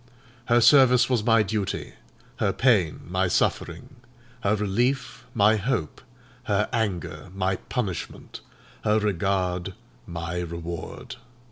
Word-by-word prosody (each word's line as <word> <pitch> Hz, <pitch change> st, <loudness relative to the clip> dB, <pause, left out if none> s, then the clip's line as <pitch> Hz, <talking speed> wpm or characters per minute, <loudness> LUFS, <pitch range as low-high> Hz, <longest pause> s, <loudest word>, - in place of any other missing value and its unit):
Her 120 Hz, 0 st, +4 dB
service 125 Hz, 0 st, +6 dB
was 120 Hz, -4 st, +2 dB
my 115 Hz, -1 st, +4 dB
duty—her 105 Hz, -1 st, -4 dB
pain, 105 Hz, -, +2 dB
my 95 Hz, +2 st, 0 dB
suffering—her 120 Hz, +2 st, -2 dB
relief, 120 Hz, +6 st, -1 dB
my 110 Hz, 0 st, +4 dB
hope—her 105 Hz, -, -3 dB
anger, 100 Hz, -6 st, -2 dB
my 95 Hz, -1 st, 0 dB
punishment—her 105 Hz, -1 st, -4 dB
regard, 95 Hz, -2 st, -1 dB, 0.3 s
my 85 Hz, 0 st, -4 dB
reward. 85 Hz, -1 st, -6 dB
105 Hz, 90 wpm, -25 LUFS, 90-120 Hz, 0.3 s, service